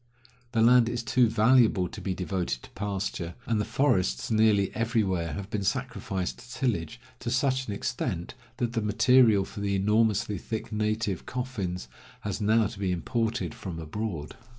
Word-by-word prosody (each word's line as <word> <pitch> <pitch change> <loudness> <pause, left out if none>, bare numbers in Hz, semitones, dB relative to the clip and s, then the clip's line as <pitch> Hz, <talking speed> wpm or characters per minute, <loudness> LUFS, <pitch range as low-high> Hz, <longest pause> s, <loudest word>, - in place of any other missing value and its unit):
The 110 -1 +3
land 120 0 +6
is 120 0 -3
too 120 0 +3
valuable 110 -5 +4
to - - -9
be 95 -2 -2
devoted 90 -8 -2
to - - -13
pasture, 95 -4 -3
and 110 -3 +1
the - - -1
forests 95 - +1
nearly 110 -3 +3
everywhere 105 -7 0
have 100 0 -6
been 105 -2 -1
sacrificed 95 0 -2
to 125 0 -13
tillage 120 -3 -2 0.2
to 120 - -4
such 130 +1 +1
an 105 - -3
extent 100 -7 -3 0.2
that 120 -1 -1
the 115 - 0
material 110 -1 +4
for 105 - -9
the 100 -1 0
enormously 105 0 +2
thick 110 +3 -5
native 105 -3 -1
coffins 105 - -3 0.3
has 105 +1 -3
now 110 +2 +4
to 105 0 -5
be 95 -2 0
imported 110 -1 -1
from 90 -4 -7
abroad. 80 -2 -4
105 Hz, 165 wpm, -28 LUFS, 95-115 Hz, 0.3 s, land